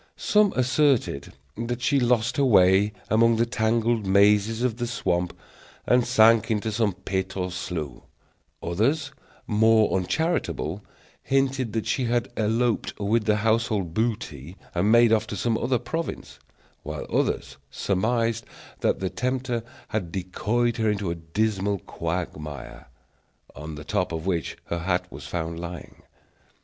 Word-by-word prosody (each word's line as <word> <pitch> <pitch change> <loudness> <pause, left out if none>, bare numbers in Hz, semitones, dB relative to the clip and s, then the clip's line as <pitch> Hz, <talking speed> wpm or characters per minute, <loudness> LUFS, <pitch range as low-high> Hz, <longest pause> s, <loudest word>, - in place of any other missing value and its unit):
Some 210 -2 +3
asserted 130 - +1 0.2
that 120 +2 -4
she 140 +2 +3
lost 120 -1 +1
her 140 - +3
way 100 -3 +5 0.2
among 115 +1 +5
the 115 +1 +2
tangled 115 0 +1
mazes 105 +3 +3
of 120 -3 0
the 120 -1 -2
swamp, 90 -7 -1 0.5
and 125 -1 +3
sank 115 -2 +5
into 110 0 0
some 105 -2 +1
pit 95 +1 -3
or 90 -1 -2
slough; 90 -5 -5 0.6
others, 135 - 0 0.3
more 110 0 +4
uncharitable, 95 - -1 0.4
hinted 135 -3 0
that 110 -1 -1
she 130 - 0
had 120 0 0
eloped 115 +2 0
with 105 +2 +1
the 105 - +3
household 110 -6 +1
booty, 95 - -3 0.2
and 90 +5 +2
made 115 -1 +6
off 110 0 +2
to - - -5
some 115 -2 0
other 125 +3 +1
province; 75 - -5 0.4
while 75 0 -6
others - - 0
surmised 115 +3 0 0.4
that - - 0
the 95 - 0
tempter 125 -1 -1 0.3
had 100 -7 -3
decoyed 110 +6 -1
her 110 -1 +1
into 100 -4 -1
a - - -3
dismal 100 +4 -1
quagmire, 80 -7 -5 0.7
on 75 +2 -7
the 75 - -8
top 100 -3 -1
of 80 0 -4
which 85 -5 -2
her 85 - -3
hat 90 +1 0
was 70 0 -9
found 85 0 -3
lying. 85 0 -8
110 Hz, 140 wpm, -25 LUFS, 90-120 Hz, 0.7 s, made